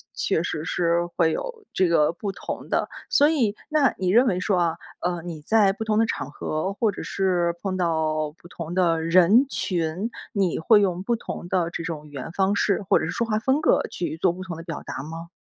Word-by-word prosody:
确 - - 0
实 160 -2 -3
是 170 -1 +1
会 165 -2 +3
有 465 - -5
这 185 - +3
个 165 -2 +3
不 195 +3 -4
同 - - -7
的。 - - 0 0.2
所 290 +1 +5
以， 235 -10 +1
那 300 -5 +3
你 185 -1 0
认 235 +7 +5
为 185 -7 +1
说 190 0 +1
啊， 170 -1 +1 0.2
呃， 175 -1 -1
你 165 -3 -7
在 205 +4 +4
不 220 - -5
同 215 0 +1
的 225 - +4
场 145 - -3
合 155 +6 -3
或 215 +1 +1
者 - - -7
是 175 -3 0
碰 190 -2 -2
到 155 -3 0
不 170 +2 -17
同 170 -1 -7
的 170 -3 +2
人 185 +9 +5
群， 180 -2 -2 0.2
你 195 -5 +1
会 205 +5 +5
用 185 -1 0
不 235 +3 +1
同 175 - -6
的 180 -3 +1
这 170 - -5
种 155 -3 -5
语 145 - -16
言 140 +3 -6
方 195 +2 +1
式 205 0 +1
或 - - +6
者 - - -2
是 - - -3
说 235 - -1
话 215 -1 +1
风 265 +6 +1
格 315 - +3
去 170 -2 -3
做 170 +1 +2
不 185 +1 -7
同 175 -4 -6
的 165 - -8
表 165 -2 -6
达 - - -6
吗？ 165 +2 -7
180 Hz, 245 characters per minute, -24 LUFS, 165-205 Hz, 0.2 s, 或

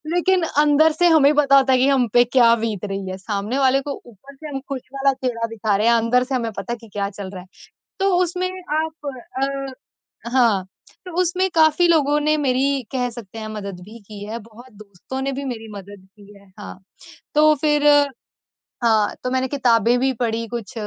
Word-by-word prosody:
लेकिन 365 0 +2
अंदर 300 +2 +5
से 350 +3 +2
हमें 300 -3 +5
पता 280 -2 +5
होता 265 -1 +3
है 255 - +3
कि 260 - +3
हम 265 -3 +2
पे 240 - +6
क्या 240 -1 +4
बीत 220 -4 -3
रही 195 -1 -5
है। 185 - -5
सामने 205 +5 -3
वाले 270 0 +3
को 280 +1 -5
ऊपर 245 +5 -16
से 310 +3 -10
हम 275 -2 -4
खुश 270 -2 -4
वाला 275 0 +1
चेहरा 245 -3 -3
दिखा 220 -2 -1
रहे 215 +3 +1
हैं, 235 - +5
अंदर 230 +2 +2
से 260 +1 -3
हमें 230 -3 -2
पता 235 - -4
है - - -5
कि 225 - -13
क्या 200 -1 -2
चल 200 -1 -8
रहा 185 -2 -8
है। 180 - -16 0.5
तो 390 0 +2
उसमें 360 +1 -2 0.3
आप 315 -2 -5 0.4
अ, 275 0 -5 0.4
हाँ, 230 -7 +2 0.4
तो 360 - -8
उसमें 365 +2 0
काफ़ी 320 +1 +4
लोगों 295 -3 +3
ने 305 +1 +2
मेरी 275 0 +1
कह 250 -2 -1
सकते 225 -3 -10
हैं 215 - -6
मदद 200 -4 -7
भी 220 +4 -12
की 205 -1 -9
है, 220 +3 -5
बहुत 230 +3 -16
दोस्तों 210 +4 -9
ने 275 +1 -2
भी 275 +1 -5
मेरी 230 -4 -6
मदद 200 -1 -11
की 205 0 -16
है। 200 0 -22
हाँ, 205 - -9 0.6
तो 305 +1 +5
फिर 295 -1 +2 1.0
हाँ, 220 -3 +2
तो 250 - -2
मैंने 260 0 0
किताबें 245 -3 +2
भी 265 +1 +1
पढ़ी 230 0 -1
कुछ 235 0 -6
250 Hz, 205 wpm, -21 LUFS, 215-280 Hz, 1.0 s, पे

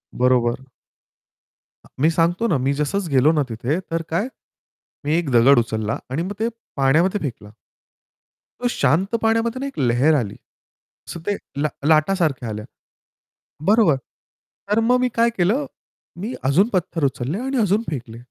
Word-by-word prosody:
बरोबर. 125 0 +2 1.2
अ, - - -16
मी 160 - +5
सांगतो 175 +7 +1
ना. 165 - +2
मी 135 +2 0
जसं 165 +5 -2
गेलो 135 +4 +5
ना 150 -3 +1
तिथे 120 +9 -2
तर 165 0 0
काय? 185 +9 0 0.8
मी 150 - +1
एक 170 -5 -1
दगड 120 +2 +6
उचलला 110 -1 -2
आणि 135 +5 -2
मग 195 - -4
ते 225 - +1 0.3
पाण्यामध्ये 160 +9 +2
फेकला. 115 -7 -5 1.1
तो 245 - +1
शांत 185 - +1
पाण्यामध्ये 230 +2 +1
ना 275 - -3
एक 275 - -8
लहेर 130 +4 +3
आली. 115 -8 -1 0.7
सो 170 - -6
ते 205 -1 0 0.2
लाट 145 -1 -3
लाटासारख्या 155 -6 +2
आल्या. 105 0 -5 1.0
बरोबर. 210 -7 +5 0.8
तर 210 - +4
मग 245 +3 +3
मी 250 0 +1
काय 230 +1 +4
केलं 210 +11 +2 0.5
मी 220 +7 -4
अजून 145 +11 +3
पत्थर 175 -3 -1
उचलले 135 - -2
आणि 265 +2 -2
अजून 210 -1 +2
फेकले. 120 -6 -6
160 Hz, 150 wpm, -21 LUFS, 130-205 Hz, 1.2 s, दगड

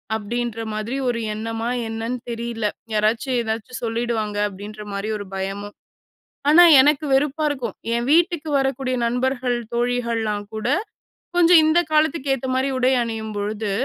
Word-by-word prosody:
அப்டின்ற 230 +1 -3
மாதிரி 215 +5 -3
ஒரு 235 - -1
எண்ணமா 225 +1 -4 0.2
என்னன்னு 225 +3 -3
தெரில. 230 -1 -4 0.3
யாராச்சு 220 +5 +1
ஏதாச்சு 225 +2 -4
சொல்லிடுவாங்க 225 -2 -2
அப்டின்ற 205 +2 -9
மாரி 200 +2 -3
ஒரு 205 - -7
பயமும். 195 +2 -5 0.7
ஆனா, 345 +4 +8 0.2
எனக்கு 295 +1 +2
வெறுப்பா 295 +3 +1
இருக்கும் 260 -4 -4 0.2
என் 235 +1 0
வீட்டுக்கு 330 -1 +2
வரக்கூடிய 270 -1 -1
நண்பர்கள், 250 0 0 0.2
தோழிகள்லாம் 235 -4 -1
கூட 220 +2 -3 0.7
கொஞ்சம் 350 -1 +7
இந்த 315 +2 +4
காலத்துக்கு 305 -2 +2
ஏத்த 265 0 -6
மாரி 260 +1 +1
உடை 255 +1 +3
அணியும்பொழுது. 215 -2 -3
235 Hz, 130 wpm, -22 LUFS, 215-265 Hz, 0.7 s, ஆனா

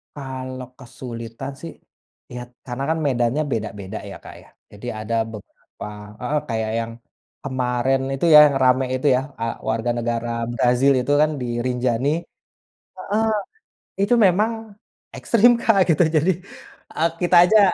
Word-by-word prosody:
Kalau 130 -2 -6
kesulitan, 120 +1 -8
sih, 165 - -7 0.6
ya, 125 - -5 0.3
karena, 125 +2 -4
kan, 160 - +1
medannya 125 +3 +1
beda-beda, 105 -2 -4
ya, - - -8
Kak, - - -12
ya, - - -21 0.2
jadi 105 +4 -10 0.2
ada 115 +2 -2 0.2
beberapa 105 -1 -11 0.3
heeh, 145 +5 -1
kayak 110 -1 -1
yang 115 0 -4 0.5
kemarin 130 0 0
itu 135 +5 -1
yang 150 -1 +9
ramai 130 0 +3
itu, 145 - 0
ya, 130 - +1 0.2
eee, 115 0 -2
warga 115 +2 -1
negara 120 0 -2 0.2
Brazil 125 +4 +3
itu, 125 +3 -1
kan, 155 0 +3
di 125 - -3 0.2
Rinjani 125 +1 0 0.9
heeh, 215 +2 -1 0.8
itu 200 - -1
memang 215 +2 +1 0.4
ekstrim, 240 +1 +4
Kak 210 -5 +2
gitu 165 +1 +4
jadi, 165 +5 +3 0.6
eee, 165 +2 +1
kita 175 0 +3
aja, 215 +1 +6
130 Hz, 140 wpm, -22 LUFS, 120-160 Hz, 0.9 s, yang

